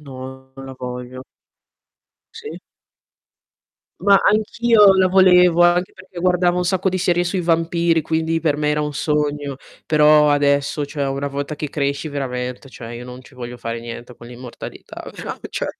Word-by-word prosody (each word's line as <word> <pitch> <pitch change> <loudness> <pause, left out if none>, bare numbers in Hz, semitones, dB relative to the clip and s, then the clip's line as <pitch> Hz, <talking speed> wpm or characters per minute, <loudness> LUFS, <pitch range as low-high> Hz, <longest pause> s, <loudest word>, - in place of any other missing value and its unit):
no, 130 -1 -10
non 135 0 -10
la 130 - -9
voglio. 125 0 -7 1.1
Sì. 450 -1 -9 1.4
Ma 200 -1 +5
anch'io 215 0 +4
la 185 -1 +4
volevo, 180 -2 +5
anche 175 +1 +2
perché 185 -1 -13
guardavo 180 0 +2
un 180 - 0
sacco 190 +1 0
di 185 - -1
serie 175 -1 +1
sui 180 +1 -2
vampiri, 165 0 +1
quindi 160 +1 -1
per 150 -2 0
me 150 0 0
era 150 - 0
un 150 0 -3
sogno. 145 -2 -1 0.3
Però 150 -1 +5
adesso, 145 0 +1
cioè, 145 -1 -4
una 140 +1 -3
volta 140 +2 -4
che 150 0 -5
cresci 140 +1 -2
veramente 125 -2 -5
cioè 115 -3 -10
io 120 +1 -8
non 125 +1 -10
ci 130 - -18
voglio 120 0 -7
fare 115 -1 -5
niente 120 +1 -9
con 120 - -13
l'immortalità, 125 0 -10
però - - -6
cioè, - - -4
150 Hz, 165 wpm, -20 LUFS, 130-175 Hz, 1.4 s, Ma